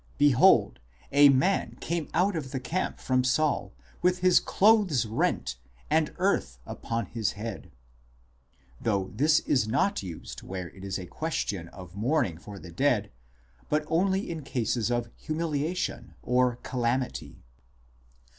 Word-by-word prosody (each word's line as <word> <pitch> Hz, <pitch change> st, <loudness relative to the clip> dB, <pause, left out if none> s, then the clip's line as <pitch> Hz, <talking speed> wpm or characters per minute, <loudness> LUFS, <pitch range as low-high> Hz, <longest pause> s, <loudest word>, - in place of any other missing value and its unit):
behold, 135 Hz, -, +5 dB, 0.3 s
a 145 Hz, +1 st, +7 dB
man 140 Hz, +9 st, +2 dB
came 170 Hz, -2 st, -2 dB
out 185 Hz, +3 st, +2 dB
of 145 Hz, -5 st, -4 dB
the 130 Hz, 0 st, -3 dB
camp 160 Hz, +9 st, -2 dB
from 130 Hz, -1 st, +1 dB
Saul, 130 Hz, -6 st, +1 dB, 0.3 s
with 180 Hz, 0 st, +3 dB
his 180 Hz, -1 st, +6 dB
clothes 195 Hz, -, +3 dB
rent, 105 Hz, -, -1 dB, 0.3 s
and -, -, +2 dB
earth 65 Hz, 0 st, 0 dB
( -, -, -26 dB
addmdh) -, -, -6 dB
upon 115 Hz, -1 st, -3 dB
his 110 Hz, 0 st, -2 dB
head 105 Hz, 0 st, -7 dB, 0.5 s
"; 65 Hz, +1 st, -31 dB
though 100 Hz, -4 st, 0 dB
this 150 Hz, +7 st, +3 dB
is 125 Hz, -6 st, +1 dB
not 140 Hz, -, +1 dB
used 90 Hz, -4 st, -8 dB
where 90 Hz, -2 st, -6 dB
it 95 Hz, -, -13 dB
is 95 Hz, -1 st, -3 dB
a 95 Hz, -, -6 dB
question 100 Hz, -, -3 dB
of 90 Hz, 0 st, -12 dB
mourning 115 Hz, -, 0 dB
for 100 Hz, +2 st, -10 dB
the 90 Hz, -2 st, -11 dB
dead, 85 Hz, -, +1 dB, 0.6 s
but 150 Hz, +1 st, +1 dB
only 190 Hz, +5 st, +1 dB
in 165 Hz, -2 st, -4 dB
cases 120 Hz, -4 st, -1 dB
of 120 Hz, -1 st, 0 dB
humiliation 160 Hz, +2 st, -3 dB
or 125 Hz, 0 st, +2 dB
calamity. 125 Hz, 0 st, -2 dB
125 Hz, 145 wpm, -28 LUFS, 100-155 Hz, 0.6 s, a